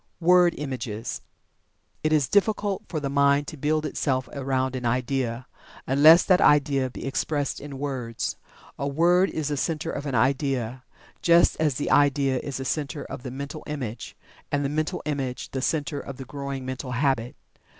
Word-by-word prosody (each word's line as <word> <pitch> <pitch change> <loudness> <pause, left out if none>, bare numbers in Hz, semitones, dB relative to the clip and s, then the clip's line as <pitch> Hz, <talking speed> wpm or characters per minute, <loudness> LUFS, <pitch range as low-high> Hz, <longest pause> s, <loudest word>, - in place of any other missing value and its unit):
WORD 180 0 +5
IMAGES. 130 -6 -5 0.8
It 155 - +1
is 150 -4 +3
difficult 205 - +1
for 160 - -3
the 145 - -3
mind 140 +1 +3
to - - -8
build 155 +2 0
itself 130 -3 -1
around 130 -1 -1
an 125 - -4
idea, 125 0 -1 0.4
unless 155 +6 +7
that 185 0 +4
idea 140 -3 +4
be 125 - -8
expressed 145 +1 -1
in 140 -2 -8
words. 130 -5 -3 0.4
A 140 - -1
word 175 +6 +3
is 155 -2 -3
the 145 - -1
center 160 +3 -2
of 145 - -5
an 135 - -2
idea, 130 -1 0 0.4
just 170 0 +5
as 150 -4 +2
the 145 - -2
idea 140 -2 +3
is 140 0 -5
the 135 - -5
center 145 0 -3
of 130 -1 -7
the 130 - -6
mental 140 +4 -6
image, 125 -7 -5 0.3
and 145 0 0
the - - 0
mental 155 +1 -2
image 135 -4 -3
the 135 - -3
center 145 0 -1
of 140 -1 -8
the 135 - -7
growing 140 -1 -5
mental 130 0 -5
habit. 125 -2 0
140 Hz, 170 wpm, -25 LUFS, 130-150 Hz, 0.8 s, unless